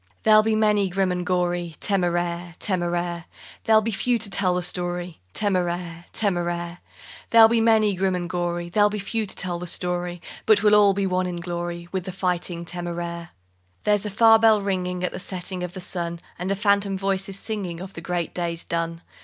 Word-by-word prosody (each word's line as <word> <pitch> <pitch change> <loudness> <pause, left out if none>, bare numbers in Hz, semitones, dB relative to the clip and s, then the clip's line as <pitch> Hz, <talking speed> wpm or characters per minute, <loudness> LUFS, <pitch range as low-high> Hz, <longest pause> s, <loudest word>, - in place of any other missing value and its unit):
_There'll 215 -1 +6
be 220 0 +1
many 210 -2 +2
grim 190 0 0
and 180 0 -2
gory, 175 -2 -1
Téméraire! 175 -2 -1
Téméraire! 175 -2 -1 0.4
There'll 220 -1 +5
be 225 - -1
few 240 +4 +1
to 215 -3 -3
tell 185 -3 +1
the 180 - -1
story, 175 -1 -2 0.2
Téméraire! 175 -4 -1
Téméraire! 175 -3 -1 0.5
There'll 225 -1 +8
be 230 0 +2
many 220 -2 +4
grim 190 0 0
and 175 -1 -3
gory, 175 -1 -2
There'll 205 +3 +4
be 210 - -4
few 215 +2 -2
to - - -3
tell 175 -2 -3
the 180 - -6
story, 175 0 -2 0.3
But 215 -2 +5
we'll 210 -1 +5
all 205 -2 +6
be 200 0 0
one 185 -1 0
in 180 - -4
glory 175 0 -5
With 185 -2 -3
the 190 - -4
Fighting 180 -2 -2
Téméraire._ 170 0 -5 0.5
There's 205 -1 +2
a 210 - -3
far 225 +2 +6
bell 220 -1 +5
ringing 180 -2 -2
At 180 - 0
the - - -6
setting 185 0 -5
of 180 -1 -4
the 190 - -7
sun, 170 -1 -3 0.2
And 180 +2 -2
a - - +1
phantom 200 -1 +1
voice 195 0 -1
is 195 - -4
singing 195 -6 -4
Of 185 +1 -8
the 165 - -8
great 175 -1 -3
days 170 -1 -3
done. 165 0 -3
180 Hz, 195 wpm, -24 LUFS, 175-200 Hz, 0.5 s, There'll